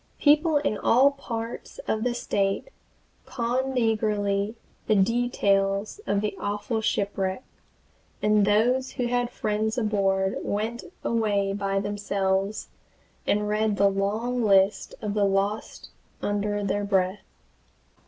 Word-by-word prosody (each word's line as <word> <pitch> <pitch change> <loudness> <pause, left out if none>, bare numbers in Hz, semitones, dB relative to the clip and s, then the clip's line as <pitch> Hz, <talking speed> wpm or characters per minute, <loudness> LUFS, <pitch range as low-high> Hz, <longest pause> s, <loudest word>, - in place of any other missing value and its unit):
People 305 +1 +4
in 215 -7 -1
all 265 +4 +5
parts 235 -4 -6
of 220 0 0
the 245 -1 0
State 195 - -1 0.6
conned 255 +2 -1
eagerly 210 -2 0 0.3
the 215 - +4
details 200 - +1
of 200 +1 +1
an 210 - 0
awful 205 +2 -2
shipwreck, 195 +1 -1 0.8
and 210 0 +3
those 240 +6 +2
who 245 - -2
had 245 0 0
friends 220 0 -1
aboard 195 -4 +1
went 220 +3 -3 0.2
away 205 -4 +1
by 195 -1 -1
themselves, 200 0 -1 0.6
and 210 0 +1
read 210 0 +1
the 200 0 +4
long 220 +5 -1
list 195 -1 +3
of 210 -1 -2
the 205 -1 +2
lost 200 +2 -1 0.3
under 205 0 -1
their 205 +1 -1
breath. 190 0 +1
210 Hz, 120 wpm, -26 LUFS, 200-230 Hz, 0.8 s, all